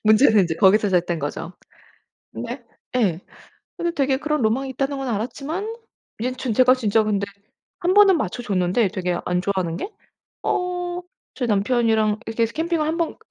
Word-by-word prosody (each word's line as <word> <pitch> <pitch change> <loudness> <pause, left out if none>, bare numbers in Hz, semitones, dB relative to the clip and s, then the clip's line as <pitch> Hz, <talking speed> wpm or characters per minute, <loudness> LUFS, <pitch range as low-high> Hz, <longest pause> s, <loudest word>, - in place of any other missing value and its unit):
문제는 215 0 +6
인제 165 -3 0
거기서 205 +1 +5
시작된 175 -2 +1
거죠. 145 +4 -5 0.8
근데 - - -6 0.3
예. 195 -10 +2 0.6
근데 345 0 -1
되게 270 -1 +2
그런 300 -1 -1
로망이 240 +5 +1
있다는 275 +2 -2
건 270 - -4
알았지만 280 - -3 0.5
이젠 255 +3 -2
전 250 -1 -3
제가 255 +2 +6
진짜 220 -3 +2
근데 200 -2 0 0.5
한번은 380 0 +5
맞춰줬는데 200 -3 0
되게 180 -3 -2
안 180 0 0
좋아하는 185 -4 -1
게 390 - -4 0.6
어 355 0 -1 0.3
제 250 - -2
남편이랑 220 0 +2
이렇게 225 +1 -1
해서 230 - +1
캠핑을 325 +2 0
한번 325 +1 -1
230 Hz, 335 characters per minute, -22 LUFS, 200-290 Hz, 0.8 s, 문제는